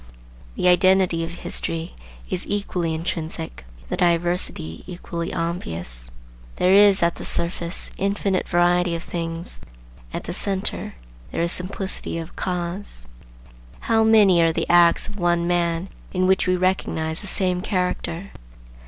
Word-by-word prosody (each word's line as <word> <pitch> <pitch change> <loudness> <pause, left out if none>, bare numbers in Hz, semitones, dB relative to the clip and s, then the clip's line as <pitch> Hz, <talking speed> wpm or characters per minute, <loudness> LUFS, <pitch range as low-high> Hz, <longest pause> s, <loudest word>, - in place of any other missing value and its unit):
The - - +1
identity 180 -1 +4
of 165 - -4
history 165 -1 -2 0.3
is 180 - -2
equally 180 -5 -1
intrinsic, 160 - -4 0.2
the - - -2
diversity 170 - 0
equally 170 -2 -5
obvious. 85 - -3 0.5
There 185 +1 +3
is, 200 -2 +6
at 170 0 +2
the - - -7
surface, 170 0 -2
infinite 195 -1 0
variety 175 0 +3
of 165 - -5
things; 165 0 -4 0.5
at - - -4
the 175 - -5
centre 195 +1 -1 0.4
there - - -2
is 170 - +2
simplicity 190 -1 -3
of 165 +1 -7
cause. 180 - -3 0.8
How 225 -1 +3
many 210 -6 +6
are 165 0 +4
the - - -1
acts 175 -1 +5
of 210 - -8
one 175 -1 +2
man 170 0 0 0.3
in 185 -1 +2
which 190 0 +3
we 185 - +3
recognize 170 -3 0
the 205 - -4
same 185 -2 0
character! 180 -1 -2
175 Hz, 135 wpm, -23 LUFS, 165-185 Hz, 0.8 s, is